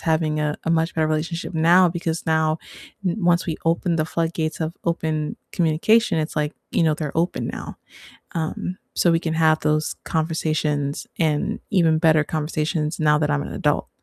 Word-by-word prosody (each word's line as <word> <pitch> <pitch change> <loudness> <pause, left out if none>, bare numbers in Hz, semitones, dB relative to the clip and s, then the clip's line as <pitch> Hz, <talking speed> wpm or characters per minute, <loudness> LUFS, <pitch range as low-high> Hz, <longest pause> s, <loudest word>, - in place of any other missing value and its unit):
having 155 -1 +1
a 150 0 -1
a 165 - 0
much 165 +1 +1
better 160 -1 +2
relationship 165 +3 -2
now 175 +3 +5
because 165 -1 -3
now 160 0 +1 0.5
n 180 +4 0
once 175 +1 +3
we 160 - -2
open 165 0 +1
the 155 - +1
floodgates 165 -1 -2
of 160 +1 -2
open 160 -2 -1 0.2
communication, 175 +4 +3
it's 155 0 -2
like, 150 0 0 0.2
you - - +2
know, 155 -1 +3
they're 150 0 -5
open 170 +2 0
now, - - -6 0.6
um, 170 +2 -3 0.2
so, 170 - +3
we 165 - +3
can 160 -1 -2
have 160 -1 +3
those 155 0 0
conversations, 155 -3 -1
and 155 -3 0
even 165 -5 +3
better 155 -2 +4
conversations 155 0 -2
now 150 -1 +4
that 150 - 0
I'm 70 - +1
an - - -7
adult. - - 0
160 Hz, 175 wpm, -22 LUFS, 155-165 Hz, 0.6 s, now